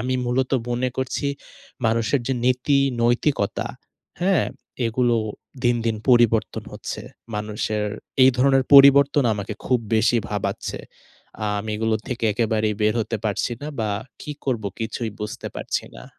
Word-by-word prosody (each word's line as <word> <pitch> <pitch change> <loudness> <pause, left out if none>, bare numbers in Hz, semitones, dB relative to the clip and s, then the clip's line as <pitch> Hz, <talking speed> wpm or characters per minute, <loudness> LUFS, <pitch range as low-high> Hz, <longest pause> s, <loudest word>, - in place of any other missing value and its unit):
আমি 130 +2 -1
মূলত 130 +1 0 0.2
মনে 125 +1 0
করছি 130 +2 -2 0.6
মানুষের 115 +4 +1
যে 135 - +1
নীতি, 130 +3 +3 0.2
নৈতিকতা, 120 -2 +1 0.6
হ্যাঁ? 190 -2 +3 0.4
এগুলো 120 +1 +2 0.5
দিনদিন 115 -2 +1
পরিবর্তন 120 -2 +3
হচ্ছে। - - -6 0.3
মানুষের 105 0 -2 0.4
এই 130 - +8
ধরনের 135 0 +4
পরিবর্তন 140 0 +7
আমাকে 105 +1 -5
খুব 125 -1 +3 0.2
বেশি 115 +2 +3
ভাবাচ্ছে। 105 -1 -3 0.6
আ - - 0
আমি 110 +1 -5
এগুলো 110 0 +1
থেকে 120 -2 -3
একেবারেই 110 -1 0
বের 105 +1 +3
হতে 115 +1 -2
পারছি 105 +3 0
না - - -4
বা 105 -1 0 0.3
কি 150 - -5
করব 120 -6 -1 0.2
কিছুই 115 0 -3
বুঝতে 105 0 -5
পারছি - - -2
না। - - -11
120 Hz, 135 wpm, -23 LUFS, 110-130 Hz, 0.6 s, এই